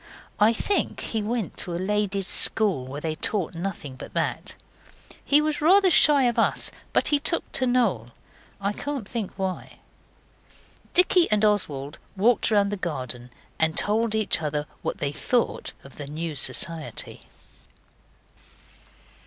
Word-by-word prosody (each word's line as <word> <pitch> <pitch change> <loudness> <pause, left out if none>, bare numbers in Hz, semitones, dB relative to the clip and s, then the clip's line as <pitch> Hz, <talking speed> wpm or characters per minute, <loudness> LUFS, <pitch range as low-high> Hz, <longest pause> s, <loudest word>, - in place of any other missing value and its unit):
I 210 +2 +5
think 395 - -1
he 225 - -3
went 220 -2 -3
to 175 - -2
a - - -2
lady's 200 +1 -1
school 185 -7 +2
where 140 +3 -7
they 160 0 -2
taught 185 +2 -2
nothing 170 -6 -6
but - - -11
that. - - -2 0.7
He 290 +1 +4
was 305 -1 -2
rather 375 +4 +5
shy 290 -3 +5
of 240 -2 +1
us, - - +3 0.2
but - - +3
he 290 - +3
took 335 +4 +2
to 255 - +3
Noel. 215 - 0 0.5
I 200 +1 -1
can't 280 -3 -5
think 220 -5 -4
why. 190 -2 -5 1.2
Dicky 360 -1 +5
and 215 0 +2
Oswald 150 -9 0 0.2
walked 220 +3 +3
round 205 -2 +2
the 205 - -3
garden 125 - -4 0.3
and 160 0 +2
told 220 +1 +1
each 215 -6 +2
other 150 -1 -2 0.2
what - - -4
they 140 - -2
thought 240 +10 -1
of 135 - -15
the 145 - -7
new 160 +2 -5
society. 155 +3 -2
200 Hz, 145 wpm, -24 LUFS, 155-235 Hz, 1.2 s, I